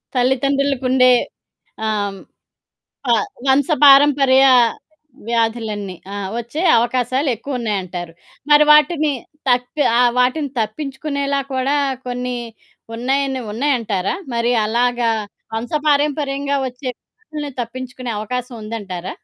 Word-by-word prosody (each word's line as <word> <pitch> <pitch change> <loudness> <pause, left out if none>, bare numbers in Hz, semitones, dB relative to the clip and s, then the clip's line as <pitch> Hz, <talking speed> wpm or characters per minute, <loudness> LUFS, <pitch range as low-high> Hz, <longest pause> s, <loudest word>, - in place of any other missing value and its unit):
తల్లితండ్రులకుండే 265 0 +2 0.8
ఆహ్, 210 -2 -1
హ్మ్. 195 - -11 0.9
ఆ! - - +6 0.3
వంశపారంపర్య 275 -1 +5 0.8
వ్యాధులన్నీ, 225 -4 -1 0.2
ఆ! - - -4 0.2
ఒచ్చే 265 +9 -5 0.2
అవకాశాలెక్కువున్నాయంటారు. 235 - -2 0.4
మరి 295 0 +7
వాటిని 300 0 +4 0.4
తప్పె 250 +4 +1
ఆహ్, 245 -1 +5
వాటిని 265 +3 +1
తప్పించుకునేలా 280 +3 -2
కూడా 270 +3 +1 0.3
కొన్ని 250 0 -3 0.6
ఉన్నాయని 265 +1 -1
ఉన్నాయంటారా? 230 - -1 0.2
మరి 235 +1 +1
అలాగా 240 +1 +1 0.5
వంశపారంపర్యంగా 285 +2 0
ఒచ్చే 255 +1 -7
వ్యాధులని 305 -10 -9
తప్పించుకునే 255 0 -6
అవకాశవుందంటారా? 215 -5 -5
255 Hz, 80 wpm, -19 LUFS, 235-280 Hz, 0.9 s, మరి